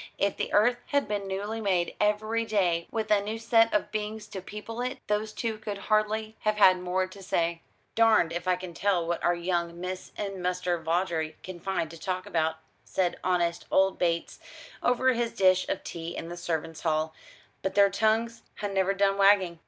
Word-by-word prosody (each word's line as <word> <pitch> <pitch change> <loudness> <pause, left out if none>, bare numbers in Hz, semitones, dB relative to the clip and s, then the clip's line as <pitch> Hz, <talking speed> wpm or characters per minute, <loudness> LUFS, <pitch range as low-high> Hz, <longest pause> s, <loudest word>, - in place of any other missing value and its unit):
If 200 0 +1
the - - -3
earth 240 +4 +4
had 285 -1 +1
been 205 -1 -2
newly 205 +4 -3
made 185 -4 0
every 215 +2 +1
day, 180 -6 +1
with 220 -1 -3
a 205 -1 +5
new 215 +2 -4
set 225 0 +4
of 210 - 0
beings 215 0 -4
to 190 - -6
people 210 +4 -7
it, 255 +2 -2
those 210 +1 -1
two 220 0 -3
could 210 -2 -5
hardly 215 +1 0
have 215 0 +1
had 185 -3 +6
more 180 +1 0
to 185 +2 -12
say. 170 -3 -1 0.3
"Darned 220 -7 +4
if 175 +1 -4
I 185 - +4
can 180 -1 -8
tell 180 -1 +1
what 170 0 -2
our 175 - +3
young 170 -1 -2
Miss 185 +1 -5
and 195 -2 -4
Muster 180 -1 0
Vawdrey 160 -1 -1
can 185 -2 -8
find 170 -4 -2
to 165 - -11
talk 185 +2 -3
about," 160 -5 0 0.3
said 180 -2 -1
honest 175 -2 0
old 190 0 +3
Bates, 170 -1 -1 0.4
over 255 +1 +3
his 235 -1 -1
dish 185 -1 +3
of - - -2
tea 170 0 -6
in 165 - -5
the 175 - -6
servants' 165 -2 -3
hall; 155 -1 0 0.5
"but 190 - -2
their 200 -1 +6
tongues 225 +3 +1 0.2
ha' - - -3
never 195 0 +1
done 195 0 +2
wagging." 195 -4 +4
190 Hz, 195 wpm, -28 LUFS, 175-215 Hz, 0.5 s, had